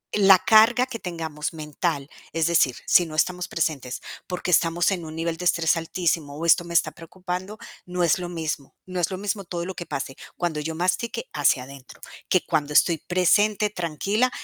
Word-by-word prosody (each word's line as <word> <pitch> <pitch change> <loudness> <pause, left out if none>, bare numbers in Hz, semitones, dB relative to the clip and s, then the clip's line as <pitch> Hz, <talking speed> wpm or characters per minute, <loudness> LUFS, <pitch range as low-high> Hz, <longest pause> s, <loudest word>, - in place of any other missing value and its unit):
la 195 -2 +7
carga 225 +3 +5
que 250 -3 -7
tengamos 165 -4 -4
mental, 150 -1 -3 0.3
es 165 -1 +1
decir, 155 -7 +3
si 175 - +5
no 155 - -8
estamos 180 +3 0
presentes 145 -6 -2 0.3
porque 180 0 -3
estamos 170 +2 +3
en 175 -4 -3
un 155 0 -8
nivel 165 0 -2
de 180 - -6
estrés 170 -1 +3
altísimo 160 -3 -2
o 165 - -4
esto 170 +1 +5
me 170 - -7
está 155 -1 +3
preocupando, 180 +5 -6 0.3
no 180 0 -1
es 170 +2 +3
lo 175 -1 -5
mismo 155 -5 -4
no 185 -1 -4
es 170 - +1
lo 185 - -3
mismo 200 0 -3
todo 175 -1 -4
lo 190 - -5
que 175 - -7
pase 135 0 -4 0.2
cuando 170 -4 -1
yo 160 +2 -4
mastique 185 +7 -1
hacia 140 -3 +2
adentro, 135 0 -13 0.3
que 185 - +4
cuando 150 -2 -1
estoy 165 +1 +4
presente, 205 +5 +2
tranquila, 200 - 0
170 Hz, 190 wpm, -24 LUFS, 155-185 Hz, 0.3 s, la